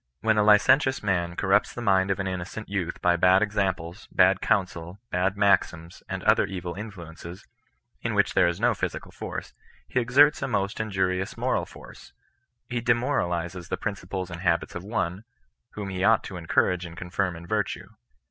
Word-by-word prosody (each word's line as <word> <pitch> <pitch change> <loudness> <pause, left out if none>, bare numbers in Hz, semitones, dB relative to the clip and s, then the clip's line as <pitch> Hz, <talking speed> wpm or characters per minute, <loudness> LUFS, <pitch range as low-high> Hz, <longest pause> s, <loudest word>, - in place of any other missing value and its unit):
When 110 -1 +3
a - - +4
licentious 130 +6 +4
man 85 -4 0
cor 95 - -3
rupts 100 +2 +3
the - - -5
mind 95 -2 +3
of 95 - 0
an 95 - -1
innocent 95 +3 -5
youth 95 -4 -3
by 90 -1 +4
bad 90 +3 +5
examples, 95 -3 -2
bad 95 0 +4
counsel, 90 -2 -1
bad 95 +2 0
maxims, 90 -4 +1
and - - -4
other - - +4
evil 90 -2 -5
influences, 90 -4 -9 0.6
in - - -2
which - - +2
there - - +4
is 85 - -2
no - - +3
physical - - -4
force, - - -7 0.3
he 125 - 0
exerts 140 +5 +4
a 135 - -1
most 100 -4 -1
injvr 95 -4 0
Tioua 95 - -6
moral - - 0
force. - - -14 0.5
He 120 -1 -2
demoralizes 90 - -1
the - - -2
principles 95 -3 -4
and 85 -1 -7
habits 85 -2 0
of 90 - -6
one, 100 -2 -2 0.5
whom 100 -2 -5
he 95 0 -3
ought 110 +2 +4
to 95 - -8
encourage 90 +1 +1
and 85 -1 -9
confirm 90 0 -2
in 85 +1 -10
virtue. 105 +3 -2
95 Hz, 180 wpm, -26 LUFS, 90-105 Hz, 0.6 s, bad